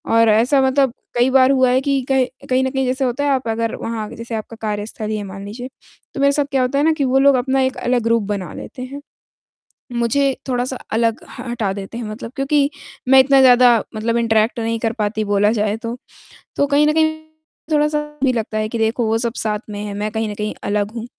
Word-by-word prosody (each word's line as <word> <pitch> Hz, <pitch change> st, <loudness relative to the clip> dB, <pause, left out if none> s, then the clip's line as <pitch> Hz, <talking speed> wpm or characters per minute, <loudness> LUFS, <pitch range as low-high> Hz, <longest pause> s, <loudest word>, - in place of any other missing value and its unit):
और 230 Hz, -1 st, +5 dB
ऐसा 245 Hz, +6 st, +4 dB
मतलब 265 Hz, -1 st, +2 dB, 0.2 s
कई 245 Hz, +2 st, +4 dB
बार 265 Hz, 0 st, +5 dB
हुआ 260 Hz, -2 st, +3 dB
है 260 Hz, +1 st, +3 dB
कि 275 Hz, -1 st, 0 dB
कह 265 Hz, -1 st, +3 dB, 0.2 s
कहीं 255 Hz, +1 st, +2 dB
न 260 Hz, -, 0 dB
कहीं 265 Hz, -1 st, 0 dB
जैसे 260 Hz, +1 st, 0 dB
होता 250 Hz, +3 st, -1 dB
है -, -, +2 dB
आप 260 Hz, -3 st, 0 dB
अगर 230 Hz, +1 st, -1 dB
वहाँ 225 Hz, -2 st, -4 dB
जैसे 230 Hz, 0 st, -7 dB
आपका 220 Hz, +1 st, -6 dB
कार्यस्थल 215 Hz, 0 st, -4 dB
ही 215 Hz, -, -1 dB
है 205 Hz, -, -4 dB
मान 195 Hz, 0 st, -8 dB
लीजिए, 245 Hz, +5 st, -7 dB, 0.4 s
तो 275 Hz, -, -4 dB
मेरे 280 Hz, 0 st, +5 dB
साथ 285 Hz, 0 st, +1 dB
क्या 265 Hz, -1 st, +2 dB
होता 255 Hz, +2 st, 0 dB
है -, -, +2 dB
ना 320 Hz, -, +4 dB
कि 295 Hz, -3 st, -1 dB
वो 260 Hz, +1 st, +3 dB
लोग 280 Hz, -1 st, +5 dB
अपना 265 Hz, +1 st, +1 dB
एक 260 Hz, 0 st, 0 dB
अलग 245 Hz, -1 st, 0 dB
ग्रुप 230 Hz, -1 st, +2 dB
बना 190 Hz, -3 st, -5 dB
लेते 255 Hz, -, -9 dB
हैं। 280 Hz, +3 st, -8 dB, 0.9 s
मुझे 260 Hz, +3 st, +1 dB
थोड़ा-सा 250 Hz, +1 st, -1 dB, 0.2 s
अलग 230 Hz, +1 st, 0 dB
ह -, -, -9 dB
हटा 215 Hz, -5 st, -1 dB
देते 200 Hz, +4 st, -7 dB
हैं 235 Hz, -, -5 dB
मतलब 220 Hz, +3 st, -7 dB
क्योंकि 280 Hz, +1 st, +2 dB, 0.4 s
मैं 265 Hz, 0 st, +7 dB
इतना 270 Hz, 0 st, +5 dB
ज़्यादा 245 Hz, -2 st, +6 dB, 0.2 s
मतलब 230 Hz, +2 st, -1 dB
इंटरैक्ट 225 Hz, +1 st, +1 dB
नहीं 230 Hz, 0 st, -1 dB
कर 225 Hz, 0 st, 0 dB
पाती 215 Hz, -1 st, -2 dB
बोला 205 Hz, +1 st, +2 dB
जाए 210 Hz, +1 st, 0 dB
तो। 230 Hz, +1 st, -5 dB, 0.6 s
तो 285 Hz, -, +2 dB
कहीं 295 Hz, +1 st, +3 dB
न 305 Hz, -, +2 dB
कहीं 315 Hz, 0 st, +3 dB, 0.6 s
थोड़ा-सा 300 Hz, 0 st, +2 dB
ये 300 Hz, 0 st, -9 dB
भी 255 Hz, -, +3 dB
लगता 220 Hz, -2 st, -3 dB
है 215 Hz, 0 st, -1 dB
कि 235 Hz, -, -3 dB
देखो 225 Hz, +1 st, 0 dB
वो 225 Hz, +1 st, +2 dB
सब 235 Hz, 0 st, -2 dB
साथ 210 Hz, -1 st, -1 dB
में 205 Hz, 0 st, -6 dB
है, 205 Hz, -1 st, -5 dB
मैं 210 Hz, +1 st, -2 dB
कहीं 220 Hz, -1 st, -2 dB
न -, -, -4 dB
कहीं 210 Hz, 0 st, -3 dB
अलग 205 Hz, +1 st, -1 dB
हूँ। 230 Hz, 0 st, -6 dB
240 Hz, 240 wpm, -19 LUFS, 220-265 Hz, 0.9 s, मैं